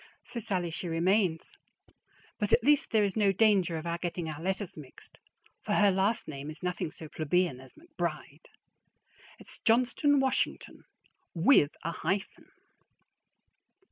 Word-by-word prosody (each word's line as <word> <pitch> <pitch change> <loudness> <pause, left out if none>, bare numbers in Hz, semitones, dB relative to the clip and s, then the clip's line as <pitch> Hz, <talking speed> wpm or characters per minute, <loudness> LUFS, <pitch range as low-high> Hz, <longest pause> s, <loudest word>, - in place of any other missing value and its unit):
So 235 - -5
"Sallie" 185 -6 -2
she 175 +2 -5
remains; 170 +1 +1 0.9
but 210 - -1
at 240 - +4
least 290 +2 +3
there 220 -2 +3
is 200 -2 -1
no 205 -3 +3
danger 195 -4 +3
of 160 - -7
our 170 0 -2
getting 175 -1 -4
our 150 +1 -8
letters 190 +1 -3
mixed, 145 -4 -14 0.4
for - - -2
her 205 -1 +4
last 195 +4 0
name 140 0 -7
is 155 +3 -9
nothing 180 -1 -2
so 160 0 -10
plebeian 155 -2 0
as 130 0 -13
McBride. 170 - -6 0.9
It's - - -8
Johnston 255 +5 +3
Washington, 265 -1 -1 0.5
with 165 - +4
a 170 - -2
hyphen. 195 +3 -3
180 Hz, 140 wpm, -29 LUFS, 165-210 Hz, 0.9 s, at